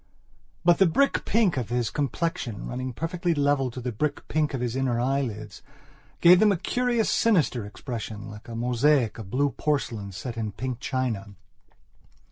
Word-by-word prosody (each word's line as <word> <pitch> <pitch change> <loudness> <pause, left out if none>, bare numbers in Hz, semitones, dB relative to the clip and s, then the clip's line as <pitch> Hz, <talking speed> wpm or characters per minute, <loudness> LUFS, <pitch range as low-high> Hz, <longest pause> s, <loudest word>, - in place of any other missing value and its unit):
But 175 -1 +5
the 195 - +6
brick 275 - +2
pink 205 -9 +2
of 120 -4 -2
his 120 -2 0
complexion, 140 - -2
running 130 +1 -4
perfectly 170 +5 -1
level 145 -2 +2
to 125 - -7
the 125 0 -3
brick 145 +6 -2
pink 150 -2 0
of - - -3
his 120 -1 -2
inner 130 -3 0
eyelids, 120 -6 -2 0.6
gave 175 +1 +8
them 210 0 +5
a 195 - +1
curious, 245 +3 0
sinister 150 - +2
expressionlike 105 -3 -7
a 115 - -7
mosaic 125 +1 +2
of 100 -4 -8
blue 140 +5 +1
porcelain 115 -8 -2
set 115 +6 -6
in 110 -3 -3
pink 125 +3 -4
china. 120 -7 -2
130 Hz, 160 wpm, -26 LUFS, 115-155 Hz, 0.6 s, gave